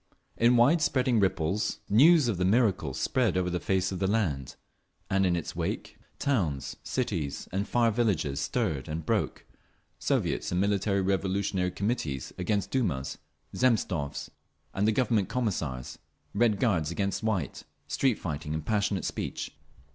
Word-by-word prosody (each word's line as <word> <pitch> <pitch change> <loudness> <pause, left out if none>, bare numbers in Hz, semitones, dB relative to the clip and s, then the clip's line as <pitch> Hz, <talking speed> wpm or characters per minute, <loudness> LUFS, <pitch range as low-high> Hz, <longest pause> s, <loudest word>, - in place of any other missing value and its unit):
In 120 +1 +4
wide 140 +8 +5
spreading 130 -5 +2
ripples 95 +1 0
news 150 +6 +6
of 110 -6 0
the 90 - 0
miracle 95 - +2
spread 120 - +1
over 90 -1 0
the 90 - -1
face 95 +1 0
of 95 - -4
the 95 - +1
land, 80 - -1 0.6
and 95 0 +3
in 85 - +2
its 85 - -4
wake - - -3 0.2
towns, 85 - -1
cities 95 - -2
and 100 +2 -1
far 120 0 +3
villages 95 - 0
stirred 70 -1 -1
and 80 0 -4
broke, - - -1 0.5
Soviets - - 0
and 90 - +1
Military 100 0 +1
Revolutionary 95 -1 0
Committees 90 - -2
against 100 +2 -1
Dumas, 75 - -1 0.4
Zemstvos 95 - 0 0.4
and 105 +3 +2
Government 115 -7 +2
Commissars—Red 100 - -2
Guards 85 -10 +1
against 100 +3 -1
White—street 110 - -1
fighting 75 -4 -4
and 80 -1 -4
passionate 100 -2 0
speech…. - - -4
95 Hz, 135 wpm, -28 LUFS, 80-115 Hz, 0.6 s, news